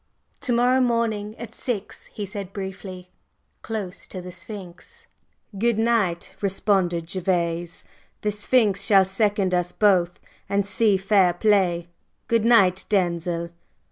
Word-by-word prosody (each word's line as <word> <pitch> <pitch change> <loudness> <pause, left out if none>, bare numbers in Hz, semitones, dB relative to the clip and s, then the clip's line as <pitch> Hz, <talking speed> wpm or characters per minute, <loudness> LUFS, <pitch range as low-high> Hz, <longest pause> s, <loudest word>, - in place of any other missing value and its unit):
"To 250 - -1
morrow 250 +2 +3
morning 225 -3 0
at 230 -2 -8
six," 225 -5 -5
he 205 - -6
said, 195 -1 -7
briefly; 190 -2 -7 0.5
"close 200 -4 -6
to 185 - -7
the 180 0 -8
Sphinx." 190 - -11 0.5
"Good!" 235 0 +2 0.6
responded 190 -4 +1
Gervase. 175 -1 -2 0.4
"The 210 - 0
Sphinx 210 -1 +2
shall 200 -2 +5
second 195 -1 0
us 180 0 0
both 180 -4 +2 0.3
and 200 0 +1
see 205 0 +2
fair 195 -2 +3
play. 175 -3 +2 0.4
Good 230 -1 +2
night, 195 -6 +4
Denzil!" 170 -3 0
195 Hz, 120 wpm, -24 LUFS, 180-215 Hz, 0.6 s, shall